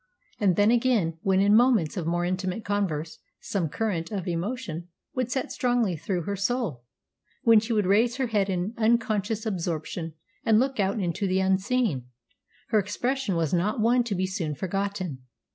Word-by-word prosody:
And 195 -5 +3
then 205 +2 +4
again, 230 -10 +2
when 190 -1 +2
in 205 +1 +5
moments 230 -9 +4
of 175 -4 -3
more 175 +1 0
intimate 185 +3 -2
converse 175 -6 -2 0.2
some 180 -6 -2
current 175 -4 -2
of 195 -3 -3
emotion 175 -1 -3 0.3
would 255 -2 -1
set 265 0 -2
strongly 245 -8 +1
through 175 +2 -2
her 200 +4 -2
soul, 200 - -2 0.6
when 230 -2 +7
she 225 +2 -4
would 210 -3 +2
raise 225 +5 +3
her 265 0 0
head 205 -4 0
in 185 +3 -1
unconscious 220 -1 +1
absorption 165 -4 -3 0.3
and 220 -2 +4
look 265 -1 0
out 200 +2 +1
into 185 +1 -1
the 185 0 +1
unseen, 190 - +1 0.6
her 215 - +4
expression 230 +2 -1
was 165 -2 0
not 195 +6 +1
one 240 +3 +3
to 210 -4 -2
be 185 +1 0
soon 170 -5 -3
forgotten. 190 -3 -3
200 Hz, 170 wpm, -26 LUFS, 175-225 Hz, 0.6 s, when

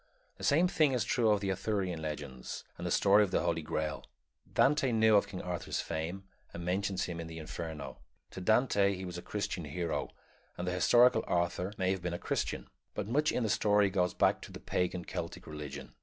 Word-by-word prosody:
The - - -11
same 165 +6 +4
thing 155 -6 +3
is 125 - +1
true 115 -3 +2
of 105 -1 +3
the 100 -1 0
Arthurian 95 -4 -1
Legend 75 -5 -5
and - - -5
the - - -2
story 100 +2 +5
of 100 - -1
the - - +1
Holy 85 -1 0
Grail. 80 -1 -3 0.5
Dante 140 -2 +3
knew 110 -1 +5
of 100 - +4
King 90 - -6
Arthur's 90 -1 -3
fame, 85 +4 -3 0.3
and 85 0 -7
mentions 95 +1 0
him 85 -2 -4
in 85 - -5
the 80 0 -8
Inferno. 80 -3 -6 0.3
To 95 - -7
Dante 100 -1 +3
he 95 0 -6
was 90 -1 -5
a - - -8
Christian 95 -5 -3
hero, 80 +3 -2 0.5
and 90 - -4
the - - +1
historical 120 +7 +5
Arthur 90 +2 0
may 95 0 +1
have 95 -2 -2
been 85 0 -2
a - - -2
Christian; - - -2 0.3
but - - -3
much 150 +6 +2
in 125 - 0
the 110 - 0
story 105 -1 +3
goes 90 -2 +1
back - - +3
to - - -10
the - - -8
pagan 90 -1 -1
Celtic - - -5
religion. 75 -2 -7
90 Hz, 210 wpm, -32 LUFS, 85-105 Hz, 0.5 s, story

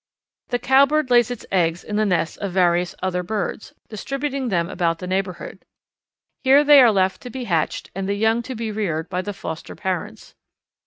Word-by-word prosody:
The 245 - -1
Cowbird 275 +3 +3
lays 240 -1 +5
its 245 -3 -6
eggs 175 -2 +1
in 210 - -5
the 215 0 +2
nests 170 -3 0
of 200 - -5
various 175 -1 +2
other 180 -1 -1
birds, 200 +2 -4 0.2
distributing 275 +4 -3
them 170 -4 0
about 170 -3 -1
the 180 - -7
neighbourhood. 185 -1 -4 0.8
Here 275 +2 +6
they 290 -1 +8
are 240 -3 +6
left 190 -2 +1
to 250 - -8
be 255 +1 -6
hatched 170 -8 -2
and 195 +1 -4
the 200 - 0
young 220 +3 +1
to 260 - -4
be 225 -1 -4
reared 175 -7 -3
by 180 - -2
the 205 - -5
foster 160 -4 -7
parents. 185 -3 -5
200 Hz, 190 wpm, -22 LUFS, 180-245 Hz, 0.8 s, they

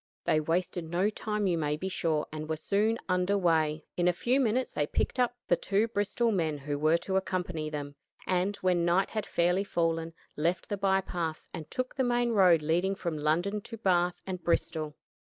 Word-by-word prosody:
They 155 - +3
wasted 170 +2 -1
no 185 +5 +1
time 210 -1 -2
you 175 -3 +1
may 150 -1 0
be 185 - -4
sure, 160 -5 0
and 155 0 -5
were 160 - 0
soon 210 +7 +1
under 180 +2 +2
way. 160 -4 +1
In 175 0 +1
a 180 - +4
few 245 +9 +1
minutes 255 0 +1
they 145 - 0
picked 255 - -1
up 245 0 +1
the - - +4
two 205 +5 +1
Bristol 225 +2 0
men 160 -7 0
who 145 +1 -4
were 155 +2 +4
to 190 +3 -1
accompany 180 -4 -2
them, 145 -2 -5 0.3
and, 185 +2 +1
when 180 -2 +3
night 175 +3 +2
had 215 -1 -3
fairly 180 +3 +2
fallen, 165 -3 -1 0.2
left 170 +3 -1
the 205 - 0
by 195 0 +2
paths 165 -4 -4
and 160 -3 -7
took 255 0 -2
to - - -39
the 265 - +2
main 240 -1 +1
road 180 -7 +5
leading 175 +5 +1
from 170 -4 -3
London 170 +8 0
to 230 +2 -9
Bath 180 -4 +1
and 185 -2 -5
Bristol. 155 -3 -1
180 Hz, 205 wpm, -29 LUFS, 160-200 Hz, 0.3 s, road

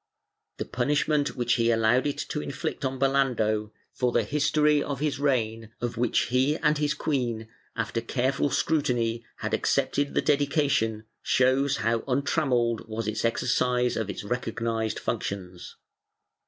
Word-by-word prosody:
The - - -3
punishment 145 +3 0
which 120 -1 +1
he 115 - +3
allowed 115 +4 +3
it 145 - -2
to 150 - -2
inflict 155 +2 -4
on 130 0 -1
Belando, 125 -6 +1 0.2
for 125 -1 0
the 120 -1 +2
history 150 +4 +2
of 140 -3 -3
his 145 -2 -1
reign 115 -5 0
of 120 -1 -3
which 120 0 +2
he 130 +5 +2
and 150 -2 +2
his 150 -1 +1
queen, 120 -7 -2 0.3
after 115 0 -2
careful 130 +4 0
scrutiny, 120 -7 0
had - - -4
accepted 145 0 +1
the - - +3
dedication, 140 -7 +1 0.2
shows 130 +2 +2
how 115 0 +2
untrammelled 125 -4 +1
was 110 0 -4
its 110 0 -2
exercise 125 +1 +1
of 110 -3 -2
its 100 - -5
recognized 115 -1 -2
functions. 90 -3 -4
125 Hz, 140 wpm, -27 LUFS, 115-140 Hz, 0.3 s, he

